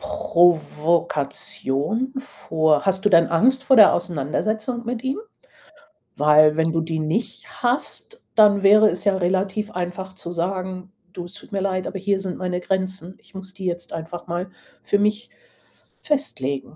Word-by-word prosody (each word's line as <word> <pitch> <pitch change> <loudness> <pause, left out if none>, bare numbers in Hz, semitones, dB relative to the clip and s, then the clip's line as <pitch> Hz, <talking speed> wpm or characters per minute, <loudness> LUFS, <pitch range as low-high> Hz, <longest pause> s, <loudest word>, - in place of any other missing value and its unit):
Provokation? 165 - 0
Vor 160 - 0
hast 190 0 0
du - - +5
denn 170 -4 +5
Angst 255 +11 +3
vor 265 - +4
der 210 -3 +8
Auseinandersetzung 215 - -2
mit 235 0 -4
ihm? 265 +1 -2 1.0
Weil 150 +1 +5
wenn 160 0 +1
du 165 0 0
die 160 0 -3
nicht 160 +10 -4
hast, 270 - -2
dann 205 -2 +5
wäre 210 +2 +6
es 180 - -2
ja 200 -2 +2
relativ 190 +3 -1
einfach 180 +1 -5
zu 175 -2 -8
sagen: 185 +1 -4 0.2
„Du, 175 - -7
es 175 - -10
tut 205 +2 -10
mir 200 - -2
leid, 185 -2 -2
aber 190 - -5
hier 200 +1 0
sind 190 -2 -5
meine 180 -1 -3
Grenzen. 185 -1 -3
Ich - - -22
muss 190 0 -8
die 190 0 -8
jetzt 175 -1 -3
einfach 165 +2 -7
mal 175 +2 -4 0.3
für 205 - +1
mich 210 +3 0 0.7
festlegen.“ 140 - -2
185 Hz, 160 wpm, -22 LUFS, 170-205 Hz, 1.0 s, der